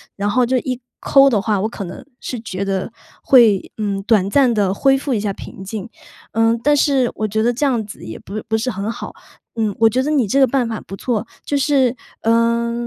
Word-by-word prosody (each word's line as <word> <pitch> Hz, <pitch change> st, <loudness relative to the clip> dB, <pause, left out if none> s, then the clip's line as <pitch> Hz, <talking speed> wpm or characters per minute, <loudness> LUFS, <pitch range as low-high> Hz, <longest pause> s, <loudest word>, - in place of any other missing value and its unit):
然 205 Hz, +1 st, -1 dB
后 250 Hz, +4 st, +2 dB
就 255 Hz, +2 st, +1 dB
一 255 Hz, 0 st, -4 dB, 0.2 s
抠 275 Hz, 0 st, +5 dB
的 225 Hz, -6 st, +2 dB
话， 210 Hz, -1 st, 0 dB
我 215 Hz, -, -1 dB
可 225 Hz, -, -6 dB
能 180 Hz, 0 st, -8 dB, 0.2 s
是 250 Hz, -, -5 dB
觉 195 Hz, -3 st, -4 dB
得， 195 Hz, +2 st, -2 dB, 0.3 s
会， 230 Hz, -7 st, +4 dB
嗯， 200 Hz, -2 st, -2 dB
短 205 Hz, -3 st, +3 dB
暂 260 Hz, +2 st, +4 dB
地 205 Hz, -4 st, +1 dB
恢 270 Hz, +6 st, +3 dB
复 270 Hz, 0 st, -2 dB
一 220 Hz, -, 0 dB
下 205 Hz, -1 st, -1 dB
平 190 Hz, -, -10 dB
静。 210 Hz, +2 st, -6 dB, 0.4 s
呃， 225 Hz, +1 st, +2 dB
但 295 Hz, +1 st, +4 dB
是 275 Hz, -4 st, +2 dB
我 215 Hz, -, -1 dB
觉 220 Hz, +1 st, 0 dB
得 240 Hz, +1 st, +2 dB
这 260 Hz, +5 st, -3 dB
样 240 Hz, -6 st, 0 dB
子 200 Hz, -, -11 dB
也 110 Hz, -, -7 dB
不 215 Hz, +3 st, -6 dB
不 220 Hz, 0 st, +1 dB
是 250 Hz, +3 st, -1 dB
很 200 Hz, +2 st, -3 dB
好， -, -, -7 dB, 0.4 s
嗯， 215 Hz, -3 st, -1 dB
我 225 Hz, -, +6 dB
觉 255 Hz, +4 st, 0 dB
得 280 Hz, -, -2 dB
你 270 Hz, -8 st, +2 dB
这 270 Hz, +8 st, +2 dB
个 265 Hz, -, +6 dB
办 250 Hz, -1 st, 0 dB
法 225 Hz, -1 st, -4 dB
不 195 Hz, -, -9 dB
错。 230 Hz, +1 st, -2 dB, 0.2 s
就 290 Hz, -, -1 dB
是， 270 Hz, -3 st, +2 dB, 0.3 s
呃， 235 Hz, +1 st, +2 dB
225 Hz, 245 characters per minute, -19 LUFS, 205-255 Hz, 0.4 s, 我